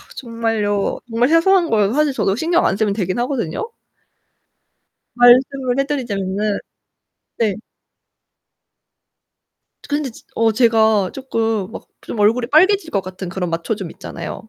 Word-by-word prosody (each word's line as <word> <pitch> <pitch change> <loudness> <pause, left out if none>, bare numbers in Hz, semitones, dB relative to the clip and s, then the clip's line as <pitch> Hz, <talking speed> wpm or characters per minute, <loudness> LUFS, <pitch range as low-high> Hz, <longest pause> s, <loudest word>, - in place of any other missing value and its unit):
정말요 225 -5 -2
정말 240 +4 +1
사소한 340 +1 +4
거여서 210 0 +2
사실 300 -2 +2
저도 195 -6 0
신경 335 +6 +1
안 190 - -1
쓰면 205 -1 +1
되긴 190 0 -2
하거든요. 250 - -3 1.4
말씀을 250 +1 +4
해 275 - +2
드리자면은 205 -7 -2 0.8
네. 215 -4 +1 2.3
그런데 290 -2 -1
지 230 - -16
어 225 -1 +2
제가 220 -4 +3
쪼끔 225 -6 -2
막 - - -9 0.2
좀 225 - -6
얼굴이 230 +4 +2
빨개질 370 +4 +3
것 200 - 0
같은 185 0 -8
그런 180 0 -3
맞춰줌 175 +3 -3
있잖아요. 170 +6 -8
225 Hz, 270 characters per minute, -19 LUFS, 200-270 Hz, 2.3 s, 사소한